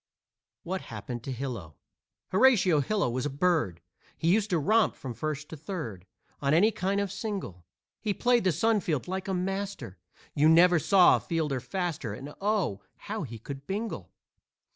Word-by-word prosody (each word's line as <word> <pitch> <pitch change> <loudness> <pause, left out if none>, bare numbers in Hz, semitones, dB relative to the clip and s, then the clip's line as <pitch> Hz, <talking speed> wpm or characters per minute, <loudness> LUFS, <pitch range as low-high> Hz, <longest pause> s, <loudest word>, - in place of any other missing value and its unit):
WHAT 185 +2 -3
HAPPENED 120 +2 -7
TO 135 - -4
HILO 120 - -5 0.5
Horatio 190 - +5
Hilo 200 +6 +1
was 125 +3 -1
a - - -3
bird, 145 - 0 0.4
He 165 +2 +2
used 215 0 +1
to 180 - +2
romp 215 +8 +3
from 130 -3 -6
first 150 +3 -4
to - - -7
third 135 - -6 0.3
On 140 +2 +2
any 210 +7 +5
kind 200 -1 -1
of 200 -2 -1
single. 195 - -5 0.4
He 215 - 0
played 245 -1 +3
the 185 - +3
sun 215 +7 +2
field 160 -6 -2
like 190 +1 -3
a 190 - -1
master, 190 - -4 0.3
You 150 +2 +4
never 175 +1 +6
saw 185 +3 +6
a - - -4
fielder 155 -6 -1
faster, 155 - -3
And 140 +5 -9
oh, 195 - 0
how 215 +1 -5
he 115 -6 -6
could 135 +5 -9
bingle! 215 +4 -4
170 Hz, 170 wpm, -28 LUFS, 135-200 Hz, 0.5 s, never